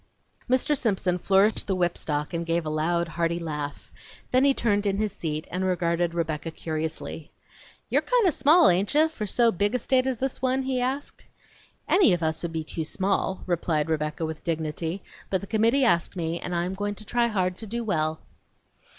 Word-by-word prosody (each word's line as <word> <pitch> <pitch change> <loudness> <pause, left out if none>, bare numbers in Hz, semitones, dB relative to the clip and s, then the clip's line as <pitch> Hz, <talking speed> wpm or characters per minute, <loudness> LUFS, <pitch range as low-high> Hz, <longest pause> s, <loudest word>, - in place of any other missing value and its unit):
Mr. 260 +4 +3
Simpson 190 -8 0
flourished 195 +4 +3
the 195 - +1
whipstock 165 -4 -1
and 170 0 -1
gave 165 0 0
a 155 - -2
loud, 170 +3 0
hearty 170 0 -1
laugh. 150 -3 -5 0.4
Then 255 +1 +4
he 280 - +6
turned 205 -5 +1
in 195 0 +1
his 210 -1 -1
seat 155 -4 -4
and 185 +2 -2
regarded 175 -2 0
Rebecca 160 -1 -2
curiously. 160 -1 -5 0.6
"You're - - +2
kind - - +2
of 340 - +3
small, 320 +5 +5
hain't 195 +9 +1
ye, 310 +1 +5
for 220 -10 -5
so 235 +3 +3
big 205 +4 0
a - - +4
state 255 +1 +1
as 260 -2 -1
this 265 +1 -3
one?" 260 +1 +1
he 260 -1 -1
asked. 265 +3 -3 0.6
"Any 365 - +5
of 175 -1 -1
us 160 0 -1
would 170 - -3
be 160 -1 -3
too 160 +1 -4
small," 190 +3 -1
replied 160 -3 0
Rebecca 155 +1 -1
with 160 -1 -6
dignity, 160 +2 -3 0.3
"but 190 - +1
the 200 - -8
committee 230 +6 +2
asked 175 -4 +2
me, 170 -1 -2
and 180 - -4
I 170 0 0
am 185 - -3
going 205 +1 -3
to 215 - -11
try 240 +2 +1
hard 185 -5 0
to 220 - -6
do 235 +3 -3
well." 155 -6 -1
185 Hz, 200 wpm, -26 LUFS, 165-230 Hz, 0.6 s, he